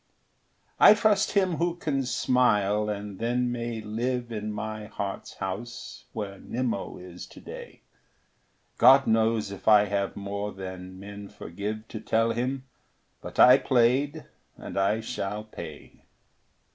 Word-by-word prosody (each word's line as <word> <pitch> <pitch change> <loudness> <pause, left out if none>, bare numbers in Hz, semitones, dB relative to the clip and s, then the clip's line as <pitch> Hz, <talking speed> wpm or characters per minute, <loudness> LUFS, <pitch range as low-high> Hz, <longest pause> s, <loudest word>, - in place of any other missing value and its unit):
I 210 - +9
trust 210 -1 +2
him 190 -5 +2
who 170 0 0
can 145 -6 -1
smile 105 -5 +2
and 100 -2 -5
then 120 +1 0
may 120 -2 -3
live 120 +3 -2
In 105 -1 -3
my 110 0 -5
heart's 100 -1 -5
house, 105 +6 -6
where 100 -3 -5
Nimmo 120 -4 -3
is 90 -1 -10
today. - - -11 1.0
God 135 +3 +8
knows 110 -2 +2
if 100 - -10
I 105 -1 +7
have 100 0 -1
more 100 +1 -4
than 95 -1 -8
men 100 0 -9
forgive 105 +5 -6
To 110 - -6
tell 115 +1 +1
him; 130 +3 -2 0.6
but - - -9
I 125 +2 +9
played, 135 +5 +2 0.3
and - - -8
I 100 +3 +2
shall 105 -1 -4
pay. 85 -8 -10
110 Hz, 135 wpm, -27 LUFS, 100-125 Hz, 1.0 s, I